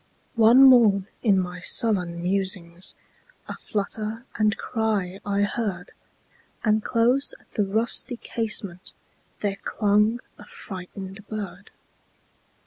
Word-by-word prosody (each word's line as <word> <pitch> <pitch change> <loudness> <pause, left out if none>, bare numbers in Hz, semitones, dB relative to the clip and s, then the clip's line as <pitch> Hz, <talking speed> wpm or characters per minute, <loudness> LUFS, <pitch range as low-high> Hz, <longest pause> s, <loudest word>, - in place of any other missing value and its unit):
One 235 +2 +6
morn, 225 -7 +6 0.2
in 200 -5 +3
my 180 -1 -4
sullen 180 -4 +3
musings,A 185 - -5
flutter 215 +3 -3
and 215 0 +1
cry 210 -5 -2
I 200 0 0
heard; 200 -4 -3 0.7
And 215 -1 +2
close 245 +4 +1
at - - -28
the 205 - 0
rusty 230 +4 +1
casementThere 200 -2 -4
clung 210 +2 +1 0.2
a - - -12
frightened 195 - -9
bird. 200 -3 -7
205 Hz, 100 wpm, -24 LUFS, 190-225 Hz, 0.7 s, One